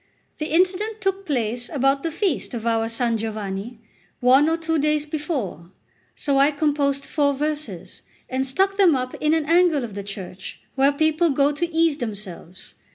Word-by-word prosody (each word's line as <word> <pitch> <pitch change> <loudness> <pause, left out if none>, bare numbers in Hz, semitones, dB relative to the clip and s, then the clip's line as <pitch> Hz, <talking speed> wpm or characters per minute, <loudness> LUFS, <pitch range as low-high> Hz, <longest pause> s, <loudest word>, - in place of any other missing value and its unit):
The 305 - -2
incident 375 +6 +1
took 385 0 -2
place 240 -3 -1
about 275 -1 +1
the 330 - -2
feast 330 - -1
of 230 -1 -5
our 225 -1 +1
San 230 0 0
Giovanni, 215 +1 -5 0.4
one 265 +5 +5
or 325 - +1
two 325 -1 -1
days 300 0 +1
before; 290 - -4 0.5
so 275 -1 +1
I 280 +1 +6
composed 285 -2 0
four 285 -2 +1
verses, 300 +1 -4 0.3
and 260 +1 -1
stuck 385 +9 +1
them 365 -7 +5
up 255 -1 -3
in 305 +1 +3
an 320 -2 0
angle 335 -3 +3
of 225 -4 -6
the 200 - -5
church 195 -2 -8
where 275 +1 +4
people 315 +3 +2
go 280 0 +3
to 335 +4 -2
ease 325 -2 +2
themselves. 195 -5 -5
285 Hz, 170 wpm, -23 LUFS, 235-320 Hz, 0.5 s, I